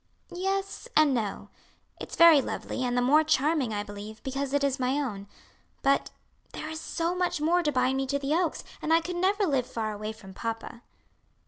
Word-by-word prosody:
"Yes, 390 +5 -2
and 305 -3 +5
no; 220 -5 -3 0.5
it's - - -7
very 335 -4 +8
lovely, 255 - -4
and 245 0 0
the 245 - +3
more 295 +5 +5
charming 300 -4 +1
I 205 -1 -2
believe, 205 +1 -9
because 270 0 -3
it 285 0 +1
is 275 -1 0
my 255 0 +1
own; 205 -8 -4 0.6
but 275 0 +2 0.4
there 310 - -5
is 315 0 -5
so 335 +1 -2
much 360 -3 0
more 335 +4 +3
to 300 -3 0
bind 260 0 +1
me 270 0 -1
to 280 +2 0
the 280 +1 -1
Oaks, 340 -1 0 0.2
and 315 - -2
I 325 - +6
could 350 +2 -5
never 395 +3 +2
live 270 -7 0
far 220 -2 -3
away 215 +1 -5
from 210 -3 -12
papa." 230 +2 -5
275 Hz, 200 wpm, -28 LUFS, 240-320 Hz, 0.6 s, very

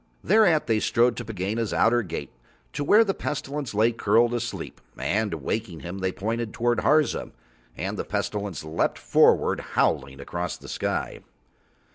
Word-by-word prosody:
Thereat 190 -6 +4
They 110 -2 +2
strode 120 +2 +2
to 120 - -4
Pegāna's 110 +1 -2
outer 120 +1 +4
gate, 95 - -6 0.4
to 145 - -2
where 210 +10 +6
the 195 -3 -1
Pestilence 140 - -4
lay 110 +3 +4
curled 120 +1 +2
asleep, 120 0 -4 0.2
and 110 0 0
waking 85 +3 -4
him 90 +2 -6
up - - -7
They 95 0 0
pointed 110 +3 -3
toward 120 0 +1
Harza, 155 0 +2 0.5
and - - -3
the - - -1
Pestilence 100 -6 -3
leapt 80 +1 -1
forward - - +3
howling 70 0 0
across 85 +4 -4
the - - -12
sky. - - -2
115 Hz, 155 wpm, -25 LUFS, 95-120 Hz, 0.5 s, where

